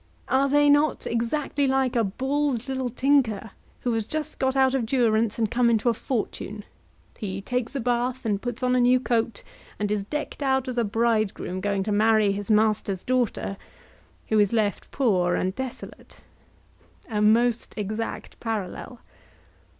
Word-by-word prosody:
Are 275 +1 +2
they 290 +1 +4
not 290 +1 +3
exactly 270 +4 -1
like 265 -1 +1
a 230 - +3
bald 265 +4 -1
little 260 -1 -2
tinker 240 -5 +1 0.3
who 245 - 0
has 225 -1 0
just 310 +8 -5
got 265 0 +1
out 265 -1 +4
of 265 -3 +1
durance 225 -3 +2
and 220 -3 0
come 245 -1 +3
into 230 +1 +2
a - - +2
fortune; 215 -3 -4 0.6
he 195 -2 -4
takes 250 +5 -3
a - - 0
bath 245 +1 -1
and 205 -2 0
puts 245 0 -5
on 250 0 +2
a - - +3
new 250 +1 +5
coat, 230 -3 -1 0.3
and 205 0 -2
is 210 -1 0
decked 295 +7 -5
out 265 -1 +1
as 250 -1 -2
a - - +3
bridegroom 215 -4 0
going 200 -1 0
to 210 - -2
marry 215 0 +4
his 205 +2 -4
master's 210 -3 +2
daughter, 245 -5 -1 0.7
who 220 - +3
is 205 -2 +3
left 215 -3 0
poor 185 -10 +1
and 185 +1 -1
desolate? 260 +2 -8 0.9
A 210 -3 -1
most 230 +2 +2
exact 215 +2 -4
parallel. 225 +2 -5
235 Hz, 165 wpm, -25 LUFS, 210-260 Hz, 0.9 s, new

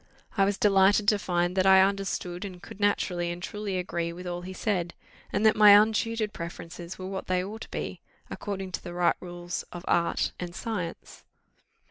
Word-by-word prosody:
I 195 - +4
was 200 0 0
delighted 200 +1 +4
to 210 - +2
find 175 -1 0
that 190 0 +3
I 190 0 +8
understood, 195 -2 -2
and 185 -3 -7
could 190 - -12
naturally 180 -4 +1
and 175 0 -4
truly 205 0 -4
agree 170 -2 -2
with 180 +2 -9
all 175 0 -4
he 185 +1 -7
said, 185 -3 -2 0.4
and 205 +2 0
that 220 - +6
my 205 -1 +9
untutored 220 0 0
preferences 170 +1 -7
were 185 - -7
what 190 0 -5
they 185 0 +1
ought 215 +4 -7
to - - -8
be, - - -5 0.3
according 195 -2 -5
to - - -5
the 175 -1 -7
right 175 -1 +3
rules 175 -1 -5
of 175 +1 -8
art 170 0 +1
and 175 -1 -6
science. 190 -7 -5
185 Hz, 190 wpm, -28 LUFS, 175-205 Hz, 0.4 s, my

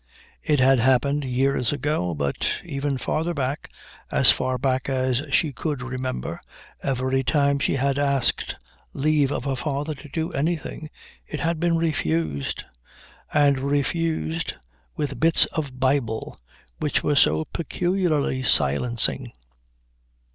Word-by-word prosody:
It 150 -2 +1
had 130 0 +5
happened 130 +4 +2
years 130 -1 +1
ago, 145 - -1
but 70 -1 -1 0.2
even 140 0 -2
farther 160 +6 -1
back, 140 +1 -2 0.4
as - - +5
far 130 0 -1
back 130 +1 0
as 130 -1 +1
she 145 +1 +2
could 145 0 -3
remember, 130 - -4 0.4
every 130 0 0
time 140 0 +2
she - - +1
had 140 +1 +1
asked 140 -3 +1 0.4
leave 145 -1 +2
of - - -2
her 135 -1 -1
father 140 +4 -2
to 145 +1 -12
do 160 +3 -2
anything 155 0 -2 0.4
it 150 - -5
had 165 -1 0
been 170 0 +2
refused; 80 - -1 0.7
and 140 -2 +4
refused 140 - -1 0.4
with 140 -2 -3
bits 165 +1 +5
of 140 -5 -4
Bible, 130 - 0 0.4
which 150 -2 0
was 145 -1 +3
so 80 +1 +3
peculiarly 170 -6 0
silencing. 120 - +2
140 Hz, 125 wpm, -24 LUFS, 130-150 Hz, 0.7 s, had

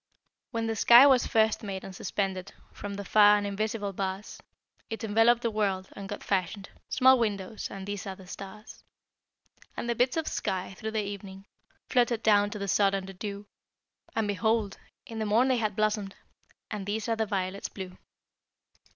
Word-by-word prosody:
When 230 -2 -2
the 225 0 -1
sky 240 +5 +8
was 265 -3 +5
first 220 -1 +2
made 195 -3 -5
and 190 - -9
suspended 190 0 -3 0.2
From 200 -1 -6
the 200 0 -6
far 210 0 +6
and 205 - -2
invisible 205 0 -2
bars, 190 +1 -4 0.5
It 225 +1 -5
enveloped 225 +3 +4
the 230 - +1
world, 195 -3 -1
and 200 -1 -9
God 205 - -6
fashioned 195 +1 -2 0.2
Small 260 0 +5
windows, 210 -2 -2
and 195 -1 -7
these 205 -1 -5
are 190 - -4
the 190 - -14
stars. 195 +3 -10 0.9
And - - -3
the 240 - +1
bits 250 +5 +1
of 320 - +1
the - - -3
sky, 185 0 -2
through 220 +4 -5
the 220 -1 -1
evening, 195 -1 -8 0.4
Fluttered 240 -2 +2
down 205 -1 +4
to 210 - -6
the 200 -1 -4
sod 195 +1 +3
and 195 -1 -3
the 195 - -9
dew, 200 +1 -6 0.7
And 225 -2 +1
behold! 215 0 0 0.3
in 225 -1 -7
the 220 - -1
morn 235 +5 +3
they 255 - +3
had 215 -3 -1
blossomed, 210 -2 0 0.6
And 205 -2 -4
these 215 +2 -2
are 230 - +1
the 220 -1 -1
violets 195 -1 -2
blue. 185 -2 -8
205 Hz, 185 wpm, -28 LUFS, 195-225 Hz, 0.9 s, sky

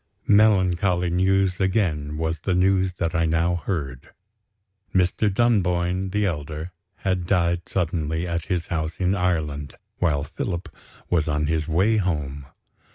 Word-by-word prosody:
Melancholy 95 -4 +3
news, 95 +1 +2
again, 90 -7 0
was 80 0 -2
the 90 +3 -1
news 95 0 +2
that 85 -2 -2
I 85 0 +2
now 80 +2 +1
heard. 70 -9 -4 0.9
Mr. 95 +3 +2
Dunboyne 95 -4 +1
the 105 +2 0
elder 80 -1 -4 0.2
had 95 -4 -2
died 85 -2 +1
suddenly, 80 -2 -1
at 85 -1 -2
his 90 -2 -1
house 80 -2 -3
in 95 0 +2
Ireland, 80 -7 -1 0.2
while 75 -5 +1
Philip 85 +3 -5 0.4
was 80 -3 +2
on 75 0 0
his 80 0 -1
way 95 +7 +2
home. 75 -8 -2
85 Hz, 135 wpm, -24 LUFS, 80-95 Hz, 0.9 s, Melancholy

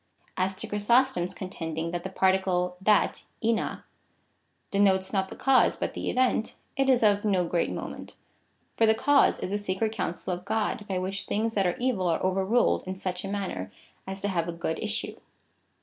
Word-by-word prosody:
As 190 +1 0
to 190 - -5
Chrysostom's 210 -2 +2
contending 165 -3 -4
that 175 0 -3
the 190 - -5
particle 190 -1 +1
that 210 +1 +2 0.2
(tva) 225 0 0 0.9
denotes 195 -1 +2
not 190 -1 0
the - - -8
cause, 270 -1 +4
but - - -3
the - - -3
event, 250 -3 +1 0.2
it 270 0 +2
is 250 -3 +4
of 205 -1 +4
no 190 -4 +2
great 170 0 0
moment. - - -7 0.6
For 225 - +4
the 220 - +5
cause 285 +5 +4
is 185 - -4
the 205 - 0
secret 205 +2 -1
counsel 185 -3 -3
of 180 +1 -6
God,^ 210 0 -1
by 190 -3 -1
which 190 +2 -3
things 225 +2 0
that 195 -3 +2
are 175 - -1
evil 240 -8 0
are 165 - +1
overruled 190 +5 +2
in 185 - -3
such 185 -1 -4
a - - -4
manner, 190 - -4 0.4
as 190 0 -5
to 205 - 0
have 170 -3 -1
a 170 - -3
good 165 -1 -3
issue. 215 0 -2
195 Hz, 185 wpm, -27 LUFS, 180-215 Hz, 0.9 s, the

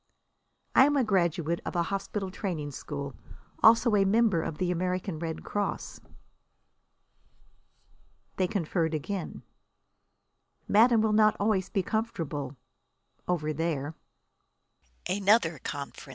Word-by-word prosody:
"I 265 - +7
am 290 0 +1
a 265 - +3
graduate 170 -5 0
of - - -5
a 170 - +2
hospital 195 +1 -3
training 170 -8 -4
school. 140 0 -6 0.5
Also 230 0 +6
a 200 - +4
member 200 -3 +3
of 160 - -4
the 180 +1 0
American 180 -1 -2
Red 165 -1 -4
Cross." 205 -1 -3 2.4
They 185 - +2
conferred 165 -3 -1
again. 180 +5 -5 1.2
"Madame 225 +2 +5
will 220 -1 +2
not 215 0 +4
always 200 -3 +1
be 195 - 0
comfortable 155 - -3 0.7
over 155 -4 0
there." 155 -1 -2
185 Hz, 105 wpm, -28 LUFS, 160-210 Hz, 2.4 s, I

